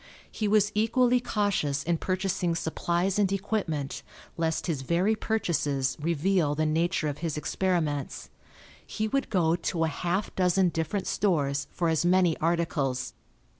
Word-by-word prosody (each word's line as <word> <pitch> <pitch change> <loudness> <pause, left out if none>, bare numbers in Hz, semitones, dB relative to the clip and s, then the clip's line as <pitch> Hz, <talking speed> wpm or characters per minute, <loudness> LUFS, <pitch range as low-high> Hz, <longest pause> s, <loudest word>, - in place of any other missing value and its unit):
He 215 - -2
was 210 0 +3
equally 245 +3 +3
cautious 200 - 0
in 170 -1 0
purchasing 185 -2 -1
supplies 175 +4 -1
and 195 -2 +2
equipment 190 -8 -2 0.3
lest 165 -1 -1
his 155 -6 -2
very 175 +10 +1
purchases 150 - -1
reveal 165 -1 +1
the 155 +1 0
nature 160 +1 +1
of 145 0 -4
his 160 -3 -3
experiments. 150 -1 -2 0.5
He 215 - -3
would 275 +5 -1
go 170 -5 +2
to 170 -1 -1
a - - +2
half 175 +6 -2
dozen 185 0 +3
different 165 +4 -2
stores 145 -8 0
for 170 - -1
as 160 0 +1
many 180 -2 +3
articles. 155 -6 -1
170 Hz, 140 wpm, -27 LUFS, 155-195 Hz, 0.5 s, was